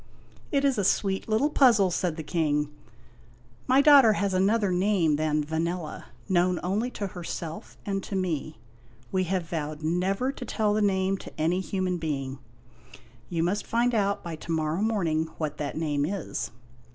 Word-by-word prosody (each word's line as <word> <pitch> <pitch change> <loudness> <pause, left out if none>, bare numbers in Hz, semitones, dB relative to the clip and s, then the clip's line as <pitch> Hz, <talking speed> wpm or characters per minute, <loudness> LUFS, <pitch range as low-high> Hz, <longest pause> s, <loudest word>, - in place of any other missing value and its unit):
" - - -26
It 280 -1 +2
is 270 -6 +2
a - - +1
sweet 195 +1 +1
little 240 +8 +2
puzzle," 225 -10 +5
said 175 -2 -1
the 160 - -5
King. 150 -2 0 0.5
" 120 - -26 0.3
My 265 +2 +5
daughter 280 -6 +7
has 200 -2 0
another 200 +2 +2
name 180 -4 +2
than 155 0 +1
Vanella, 165 +1 -3 0.2
known 180 -2 +2
only 205 +7 0
to 205 - -2
herself 165 - -6
and 195 -1 -1
to 200 - -5
me. 175 - -2 0.5
We 185 -1 +1
have 180 -2 -1
vowed 155 -2 -4
never 190 +10 0
to 275 - -8
tell 215 -3 0
the 215 - +1
name 195 -1 +1
to - - -11
any 170 +4 +2
human 185 -1 -1
being. 135 -4 -3 0.9
You 165 -2 0
must 190 +4 -1
find 240 +1 +1
out 200 -2 +1
by 170 -2 -5
to 165 - -7
morrow 160 +2 0
morning 170 -8 0
what 155 -2 -3
that 145 0 -4
name 150 -3 0
is." 195 -2 -3
185 Hz, 175 wpm, -27 LUFS, 160-205 Hz, 0.9 s, daughter